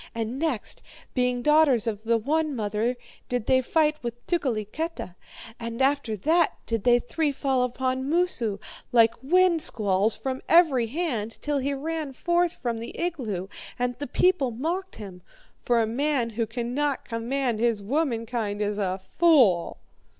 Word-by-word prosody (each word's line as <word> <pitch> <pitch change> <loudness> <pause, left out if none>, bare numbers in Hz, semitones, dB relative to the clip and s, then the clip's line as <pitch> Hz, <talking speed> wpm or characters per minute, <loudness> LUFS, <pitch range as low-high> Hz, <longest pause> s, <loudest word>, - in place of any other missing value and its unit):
And 230 +3 -3
next, 295 -9 -3 0.3
being 250 -1 0
daughters 300 -6 +4
of 215 -3 -2
the 230 0 +3
one 300 +5 0
mother, 220 +2 -1 0.3
did 245 -3 -1
they 260 0 +4
fight 305 +3 +1
with 240 0 -6
Tukeliketa. 275 - -2 0.5
And 230 0 -5
after 270 -5 +1
that 320 - +2
did 225 -3 -2
they 240 -1 +6
three 290 +5 -1
fall 270 -2 0
upon 260 +2 -1
Moosu, 295 - 0 0.3
like 230 -2 +5
wind 345 +3 +3
squalls, 205 -4 +1
from 260 -1 -4
every 300 -9 +5
hand, 240 -6 -3
till 295 -1 -1
he 280 +1 -1
ran 310 0 -4
forth 345 +4 +1
from 235 -2 -3
the 230 - -7
igloo, 240 - -3 0.3
and 245 0 -1
the 285 - -4
people 360 -1 +2
mocked 335 +11 -3
him. 190 -4 -9 0.4
For 235 -1 +2
a - - +1
man 250 +1 0
who 225 0 -2
cannot 250 +5 -2
command 235 0 -2
his 230 -3 +1
womankind 230 -5 -1
is 205 0 -1
a 190 -2 -1 0.2
fool.' 255 - +4
250 Hz, 150 wpm, -26 LUFS, 225-300 Hz, 0.5 s, they